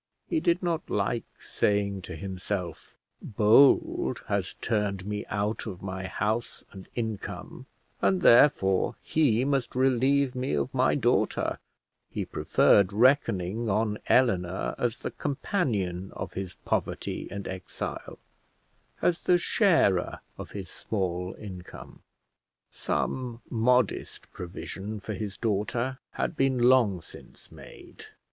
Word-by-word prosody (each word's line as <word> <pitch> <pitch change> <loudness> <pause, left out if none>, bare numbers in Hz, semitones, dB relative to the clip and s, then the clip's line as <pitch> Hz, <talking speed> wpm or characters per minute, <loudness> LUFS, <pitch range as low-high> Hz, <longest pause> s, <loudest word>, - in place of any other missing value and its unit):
He 330 - +1
did 175 - +1
not 170 -2 -1
like 105 +3 0
saying 100 -1 0
to - - -5
himself, 95 -1 -5 0.3
Bold 110 - +4
has - - -2
turned 100 -4 -1
me 105 0 -4
out 105 +2 -2
of 95 -4 -7
my 95 0 -4
house 105 +6 -2
and 95 -3 -11
income, 110 -4 -5 0.3
and, 185 -2 +2
therefore, 105 -7 +5
he 130 -6 +2
must 135 -4 -1
relieve 130 +1 +3
me 125 - -1
of 70 -1 -2
my - - +3
daughter; - - +1 0.5
he - - -3
preferred 100 -1 +3
reckoning 115 -3 +2
on 105 +1 0
Eleanor 95 -8 +2
as 120 -1 -1
the - - -3
companion 110 - -2
of 95 0 -6
his 95 -2 -5
poverty - - -2
and 100 -1 -6
exile, 95 -1 -6 0.9
as 175 -1 +2
the 180 - +4
sharer 165 - +2
of - - -8
his 95 -3 -7
small 90 -3 -3
income. 95 -4 -10 0.7
Some 120 -3 -3
modest 125 0 +1
provision 95 +4 -6
for 110 +2 -5
his 100 0 -5
daughter 115 +4 -1
had - - -2
been 135 -2 +2
long 120 -8 +4
since - - -15
made. - - -13
105 Hz, 120 wpm, -28 LUFS, 95-130 Hz, 0.9 s, therefore